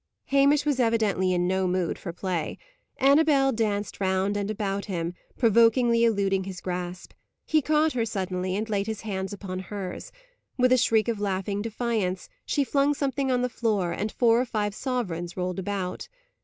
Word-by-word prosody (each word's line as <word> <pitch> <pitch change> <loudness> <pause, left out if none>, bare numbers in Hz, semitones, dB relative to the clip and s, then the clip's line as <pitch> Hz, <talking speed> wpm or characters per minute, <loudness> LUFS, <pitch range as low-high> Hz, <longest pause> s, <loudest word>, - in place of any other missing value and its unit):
Hamish 280 +2 +4
was 290 -3 +1
evidently 220 -6 +2
in 175 0 +1
no 190 0 +1
mood 180 -2 -1
for 175 - -5
play. 175 -2 -3 0.4
Annabel 280 0 +4
danced 210 -4 -2
round 190 +1 +1
and 205 0 -2
about 200 -2 -2
him, 170 -3 -3 0.2
provokingly 235 +1 +4
eluding 195 -4 +2
his 190 -2 -6
grasp. 180 -1 -5 0.3
He 310 -1 +3
caught 305 +2 +2
her 240 -2 0
suddenly, 185 -4 -2
and 215 +2 -2
laid 205 -2 -1
his 220 -2 -4
hands 190 -3 -4
upon 190 -2 -5
hers. 190 -1 -6 0.5
With 255 -1 +3
a 255 - +6
shriek 225 -2 +3
of 230 -3 -1
laughing 200 0 -2
defiance, 220 -4 -2 0.2
she 285 - +1
flung 280 +1 +2
something 275 -1 -1
on 250 -1 +1
the - - +2
floor, 215 -7 0
and 210 +4 -2
four 235 -1 +3
or - - -1
five 210 -3 -2
sovereigns 190 -10 -3
rolled 180 +1 -2
about. 190 -1 -4
205 Hz, 170 wpm, -26 LUFS, 185-240 Hz, 0.5 s, a